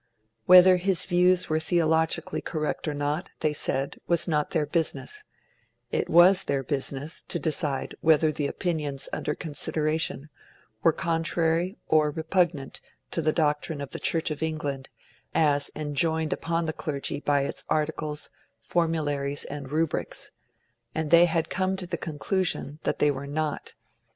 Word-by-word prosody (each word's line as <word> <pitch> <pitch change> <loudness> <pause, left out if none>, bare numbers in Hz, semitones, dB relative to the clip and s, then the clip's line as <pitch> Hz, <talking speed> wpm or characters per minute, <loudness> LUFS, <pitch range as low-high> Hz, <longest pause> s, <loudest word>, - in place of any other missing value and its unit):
Whether 185 0 +8
his 185 0 +2
views 180 0 +3
were 155 0 +1
theologically 160 -1 +1
correct 155 0 -3
or 150 - -1
not, 145 +5 -2
they 155 -1 +1
said, 135 -1 -1
was 170 0 +2
not 150 -3 0
their 155 -3 0
business; 170 - -2 0.7
it - - -1
was 180 +3 +6
their 140 -1 -1
business 140 +2 -3
to - - -1
decide 150 -4 -1
whether 155 -1 +4
the 145 -1 -2
opinions 150 -6 -2
under 150 - -2
consideration 155 -1 -1 0.5
were 165 - +5
contrary 165 +3 0
or 155 -1 +3
repugnant 160 -2 -1 0.3
to - - -1
the 155 - +2
doctrine 150 -1 0
of 140 -2 -6
the - - -5
Church 165 -1 +1
of 150 - -5
England 145 -4 -3 0.5
as 145 -2 +3
enjoined 155 +1 0
upon 165 0 -2
the 160 - -2
clergy 145 -2 -3
by 145 -1 +1
its - - -3
Articles, 155 -1 -2 0.3
Formularies, 145 -4 0
and 140 -2 -7
Rubrics; 160 +1 -2 0.6
and 155 -1 -2
they 170 +1 +8
had 165 -1 0
come 185 0 -1
to 190 -1 -4
the 175 - -3
conclusion 160 -1 -2
that - - 0
they 150 - +3
were 140 0 -6
not. 150 +1 -3
155 Hz, 145 wpm, -26 LUFS, 145-170 Hz, 0.7 s, Whether